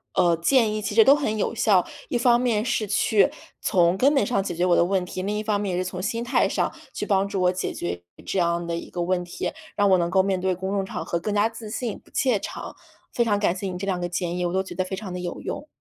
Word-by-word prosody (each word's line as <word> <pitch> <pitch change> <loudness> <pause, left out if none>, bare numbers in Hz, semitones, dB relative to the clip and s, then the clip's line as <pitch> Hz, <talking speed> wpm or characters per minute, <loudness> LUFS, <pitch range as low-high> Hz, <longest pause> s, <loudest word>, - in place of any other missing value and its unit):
呃， 170 -1 +4
建 225 +4 +3
议 215 - -2
其 205 - -3
实 225 - +8
都 275 +5 +7
很 220 -8 -1
有 215 - -1
效， 200 -5 +3 0.2
一 245 - +1
方 240 0 +4
面 235 -4 +1
是 235 -2 0
去 210 0 +3 0.3
从 175 0 +3
根 275 +7 +4
本 275 - +4
上 200 -6 0
解 180 - -3
决 175 - 0
我 175 -1 +4
的 - - +4
问 190 0 +1
题。 185 - -5
另 205 +2 -1
一 - - -1
方 210 -1 0
面 200 -3 -2
也 180 - 0
是 - - -9
从 180 - -6
心 230 +4 -2
态 240 +3 +2
上 - - 0 0.2
去 - - -4
帮 195 -2 +2
助 195 -1 -2
我 180 0 +4
解 185 0 -3
决 85 0 -4 0.2
这 - - -2
样 170 0 +1
的 170 - -1
一 170 - -6
个 175 - -3
问 180 +1 0
题， 175 - -4 0.2
让 205 -1 +3
我 190 - +6
能 170 -1 0
够 190 0 +5
面 190 -1 0
对 185 0 +1
公 190 +2 -4
众 200 -1 0
场 - - -5
合 170 - -1
更 205 +4 -3
加 210 +2 +3
自 225 -1 -9
信、 235 -2 -3
不 - - -25
怯 250 -7 +2
场。 - - -7 0.4
非 240 - +2
常 205 -3 +1
感 195 -4 +1
谢 195 - -5
你 185 - -4
这 190 - -4
2 185 -2 -1
个 175 - -2
建 175 0 -2
议， 180 - -1
我 175 - -1
都 190 - +2
觉 190 - -9
得 185 - 0
非 190 - -4
常 195 -1 -7
地 180 - -4
有 175 -1 -5
用。 - - -5
195 Hz, 310 characters per minute, -24 LUFS, 180-215 Hz, 0.4 s, 实